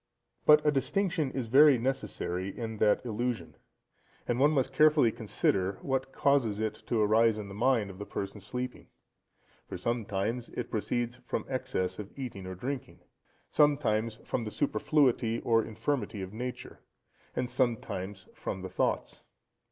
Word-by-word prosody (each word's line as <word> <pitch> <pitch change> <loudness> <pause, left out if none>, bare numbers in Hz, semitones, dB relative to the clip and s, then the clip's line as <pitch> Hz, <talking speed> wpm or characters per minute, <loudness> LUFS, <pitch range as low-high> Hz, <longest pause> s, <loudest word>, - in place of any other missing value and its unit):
But 150 0 +7
a 150 - +5
distinction 155 +2 0
is 130 -2 -3
very 135 +4 +7
necessary 105 -7 -2
in 110 -2 -4
that 105 +3 +3
illusion, 120 +1 -2 0.7
and 120 0 0
one 145 +2 +6
must 135 -3 +1
carefully 150 -4 +5
consider 100 -4 0
what 135 0 -1
causes 130 -9 +2
it 110 -1 0
to 115 - +1
arise 110 +1 +4
in 105 -2 -6
the - - -8
mind 110 -2 +2
of 95 - -13
the 105 - -5
person 100 +1 -5
sleeping; 125 +5 -5 0.8
for - - -5
sometimes 115 0 -2
it - - -4
proceeds 120 +2 -1
from - - -2
excess 130 -9 -2
of 105 -1 -6
eating 110 -8 -6
or 95 - -5
drinking; 130 +7 -5 0.5
sometimes 115 -7 +2
from 120 - -2
the 110 - -4
superfluity 115 0 +2
or 115 -1 +3
infirmity 110 -2 -2
of 95 +2 -8
nature, 125 +3 -6 0.6
and 125 - 0
sometimes 105 -6 -2
from 95 - -5
the 95 - -5
thoughts. 95 - -1
115 Hz, 150 wpm, -30 LUFS, 105-130 Hz, 0.8 s, But